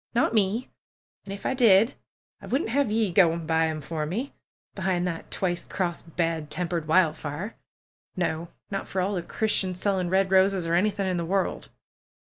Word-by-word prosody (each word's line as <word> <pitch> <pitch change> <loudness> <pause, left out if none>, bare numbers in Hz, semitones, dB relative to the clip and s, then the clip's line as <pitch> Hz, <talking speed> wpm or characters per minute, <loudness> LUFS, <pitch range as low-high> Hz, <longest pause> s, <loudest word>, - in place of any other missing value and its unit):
Not 235 - +2
me! 215 +3 +1 0.6
And 195 - -7
if 200 - -13
I - - +1
did, 230 -1 +5 0.5
I - - -10
wouldn't 260 -3 0
have 280 -1 +2
ye 215 -2 +1
go 180 -3 +6
an' 165 0 -4
buy 160 0 +2
'em 155 -1 -3
for 155 +1 -3
me, 230 - -3 0.4
behind 185 -2 0
that 170 -2 -4
twice 175 -2 -1
crossed, 170 -3 -4
bad 165 -3 -1
tempered 170 -1 -2
Wildfire! 160 +3 +1 0.6
No! 170 -2 -1 0.2
Not 195 - -3
for 190 - -3
all 190 +3 0
the 180 - -1
Christians 185 -1 0
selling 190 -3 0
red 190 +1 +2
roses 190 -1 +4
or 165 - -1
anything 195 +2 +1
in 185 -1 0
the 170 - -1
world!" 190 +3 -1
185 Hz, 180 wpm, -26 LUFS, 170-200 Hz, 0.6 s, go